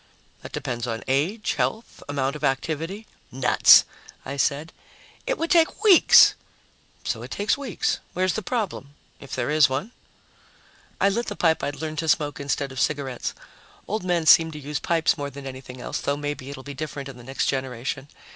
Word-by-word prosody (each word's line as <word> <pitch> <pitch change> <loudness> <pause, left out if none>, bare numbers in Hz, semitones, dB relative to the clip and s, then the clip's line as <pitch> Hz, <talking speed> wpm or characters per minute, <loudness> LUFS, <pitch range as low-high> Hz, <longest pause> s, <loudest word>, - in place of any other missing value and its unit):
"That - - -10
depends 120 -1 -4
on 115 -1 -4
age, 170 +12 0
health, 225 +1 -3
amount 140 0 -1
of 150 - -9
activity 160 +9 -2 0.2
" - - -35
"Nuts!" 125 - +7 0.4
I 140 - -5
said. 140 +3 -1 0.5
"It - - 0
would 330 - -2
take 335 +4 +3
weeks!" 395 -6 +8 0.7
"So - - -3
it - - -8
takes 205 +1 0
weeks. 275 -7 -2
Where's 185 -1 +1
the 220 - -2
problem 195 - -4 0.2
if 140 - -8
there - - -1
is 150 -2 +5
one?" 140 - -3 1.1
I - - +4
lit 235 +4 -2
the 205 - -4
pipe 165 -4 +1
I'd 145 -1 -3
learned 155 -1 -4
to 165 - -2
smoke 145 -1 +1
instead 140 0 -2
of 130 - -6
cigarettes 140 -4 -2 0.5
old 215 -1 -2
men 175 -3 0
seem 160 +1 +7
to 150 - -7
use 145 0 -4
pipes 165 -1 +1
more 140 0 -3
than 140 0 -10
anything 130 -1 -9
else, - - -4
though 140 0 -1
maybe 145 -2 -5
it'll 135 -2 -8
be 140 - -7
different 145 -1 -6
in 135 -2 -10
the 120 - -12
next 135 +3 -2
generation. 130 0 -3
145 Hz, 185 wpm, -24 LUFS, 135-180 Hz, 1.1 s, weeks